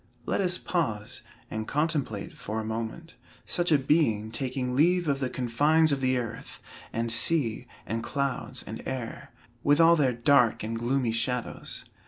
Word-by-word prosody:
Let -, -, 0 dB
us 180 Hz, -2 st, +2 dB
pause, 115 Hz, -, -2 dB, 0.3 s
and 110 Hz, 0 st, -4 dB
contemplate, 145 Hz, -8 st, -1 dB
for 110 Hz, +1 st, -4 dB
a 110 Hz, -, -4 dB
moment, 115 Hz, +9 st, -5 dB, 0.3 s
such 175 Hz, -1 st, +1 dB
a 150 Hz, -, +7 dB
being 130 Hz, -7 st, +1 dB
taking 125 Hz, +1 st, -2 dB
leave 175 Hz, +4 st, +3 dB
of 140 Hz, -1 st, +1 dB
the 130 Hz, -2 st, -1 dB
confines 145 Hz, +7 st, +3 dB
of 140 Hz, -1 st, 0 dB
the 130 Hz, 0 st, +2 dB
earth, 115 Hz, -2 st, -5 dB, 0.3 s
and 115 Hz, 0 st, -1 dB
sea, 120 Hz, -1 st, +1 dB, 0.2 s
and 115 Hz, +1 st, -2 dB
clouds, 140 Hz, +1 st, -2 dB
and -, -, -7 dB
air, 130 Hz, -3 st, -5 dB, 0.3 s
with 145 Hz, +3 st, +3 dB
all 165 Hz, +1 st, +7 dB
their 140 Hz, -5 st, +3 dB
dark 125 Hz, -2 st, +3 dB
and 110 Hz, +1 st, -3 dB
gloomy 120 Hz, 0 st, 0 dB
shadows. 125 Hz, +1 st, -3 dB
130 Hz, 160 wpm, -28 LUFS, 115-150 Hz, 0.3 s, a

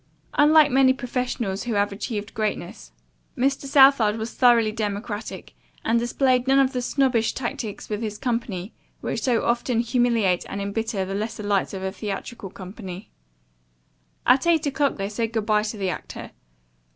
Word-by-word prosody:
Unlike 300 Hz, 0 st, +5 dB
many 260 Hz, 0 st, +5 dB
professionals 245 Hz, -5 st, -3 dB
who 235 Hz, -3 st, -2 dB
have 205 Hz, 0 st, +1 dB
achieved 205 Hz, +1 st, -5 dB
greatness, 215 Hz, -2 st, -4 dB, 0.5 s
Mr. 275 Hz, +2 st, 0 dB
Southard 270 Hz, -6 st, +5 dB
was 225 Hz, +1 st, -5 dB
thoroughly 235 Hz, -4 st, +4 dB
democratic, 210 Hz, 0 st, -5 dB, 0.3 s
and 230 Hz, +1 st, +3 dB
displayed 250 Hz, +1 st, +1 dB
none 270 Hz, 0 st, +4 dB
of 270 Hz, -1 st, +3 dB
the 250 Hz, -, -1 dB
snobbish 245 Hz, -3 st, +1 dB
tactics 225 Hz, -4 st, -5 dB
with 210 Hz, 0 st, -3 dB
his 210 Hz, -2 st, -4 dB
company 230 Hz, -6 st, -3 dB, 0.3 s
which -, -, -3 dB
so 245 Hz, -3 st, +1 dB
often 235 Hz, 0 st, +1 dB
humiliate 235 Hz, -6 st, +2 dB
and 200 Hz, -, -4 dB
embitter 200 Hz, 0 st, -2 dB
the 195 Hz, -, -5 dB
lesser 210 Hz, +1 st, -4 dB
lights 200 Hz, -1 st, 0 dB
of 190 Hz, -, -5 dB
a 190 Hz, -, -2 dB
theatrical 205 Hz, +1 st, -6 dB
company. 190 Hz, 0 st, -9 dB, 1.1 s
At 260 Hz, +6 st, +4 dB
eight 330 Hz, -2 st, +3 dB
o'clock 285 Hz, 0 st, 0 dB
they 195 Hz, -1 st, -2 dB
said 225 Hz, +2 st, -3 dB
good 220 Hz, -2 st, -1 dB
bye 215 Hz, -1 st, +3 dB
to 215 Hz, +1 st, -4 dB
the 190 Hz, -2 st, -1 dB
actor. 155 Hz, -, -8 dB
225 Hz, 160 wpm, -24 LUFS, 205-250 Hz, 1.1 s, Unlike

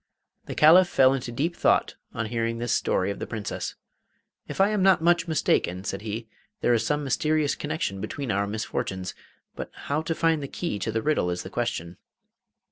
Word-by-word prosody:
The -, -, -5 dB
Caliph 170 Hz, +4 st, +7 dB
fell 130 Hz, -5 st, +5 dB
into 125 Hz, -3 st, -3 dB
deep 155 Hz, +8 st, -1 dB
thought -, -, +2 dB, 0.2 s
on 115 Hz, -, -3 dB
hearing 115 Hz, +1 st, -1 dB
this 120 Hz, 0 st, -2 dB
story 95 Hz, +2 st, +1 dB
of 100 Hz, -, -6 dB
the -, -, -4 dB
Princess. 110 Hz, -2 st, -4 dB, 0.7 s
'If -, -, -7 dB
I 195 Hz, +1 st, +5 dB
am 210 Hz, -2 st, 0 dB
not 190 Hz, -3 st, +4 dB
much 170 Hz, 0 st, +3 dB
mistaken,' 95 Hz, -, +1 dB
said 100 Hz, -1 st, -4 dB
he, 110 Hz, +1 st, -5 dB, 0.3 s
'there 120 Hz, -, +3 dB
is 115 Hz, -1 st, +2 dB
some 150 Hz, +5 st, 0 dB
mysterious 150 Hz, +2 st, +1 dB
connection 150 Hz, -, -3 dB
between 140 Hz, -5 st, -3 dB
our 100 Hz, 0 st, 0 dB
misfortunes, 95 Hz, -3 st, -3 dB, 0.4 s
but -, -, -6 dB
how 145 Hz, +2 st, -3 dB
to 165 Hz, 0 st, -2 dB
find 165 Hz, -2 st, +2 dB
the 140 Hz, -, -4 dB
key 135 Hz, -, -3 dB
to 110 Hz, -, -2 dB
the 110 Hz, 0 st, -1 dB
riddle 150 Hz, -12 st, +1 dB
is 90 Hz, 0 st, -3 dB
the -, -, -9 dB
question. 85 Hz, +2 st, -3 dB
120 Hz, 195 wpm, -26 LUFS, 105-155 Hz, 0.7 s, Caliph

